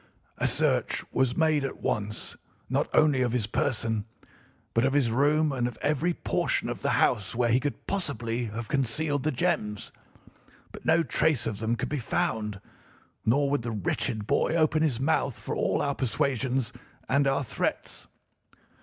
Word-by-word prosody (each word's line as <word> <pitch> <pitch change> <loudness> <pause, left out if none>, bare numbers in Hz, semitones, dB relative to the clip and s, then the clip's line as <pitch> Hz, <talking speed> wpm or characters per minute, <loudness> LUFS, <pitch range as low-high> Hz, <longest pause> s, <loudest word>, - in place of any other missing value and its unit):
A - - +2
search - - +2
was 130 -2 +1
made 155 -3 +3
at 135 - -4
once 105 0 -2 0.4
not - - +1
only 150 -4 +4
of 120 -2 +1
his 120 -4 +1
person 110 -2 -1 0.7
but 115 - +2
of 135 +1 +2
his 135 -5 +2
room 150 +5 +3
and 125 -3 0
of 120 - -7
every 150 +4 +1
portion - - 0
of - - -5
the - - 0
house 100 0 +1
where 120 -1 +2
he 125 - +4
could 145 +1 -4
possibly 120 - -2
have 115 +1 -5
concealed 145 +2 0
the 155 - 0
gems; 105 -5 -1 0.8
but - - -11
no 160 +1 +5
trace 145 0 +1
of 105 -3 -3
them 110 +2 0
could - - -3
be 150 - -1
found, 105 -3 -1 0.7
nor 140 +5 +3
would 145 - +1
the 120 - -4
wretched 110 +1 -1
boy 160 - +1
open 155 -1 +3
his 140 -7 +1
mouth 140 -3 0
for - - -4
all - - +1
our 140 - 0
persuasions 130 -1 -1 0.3
and 140 +1 +3
our 135 +1 +1
threats. 120 - -3
130 Hz, 170 wpm, -27 LUFS, 115-145 Hz, 0.8 s, no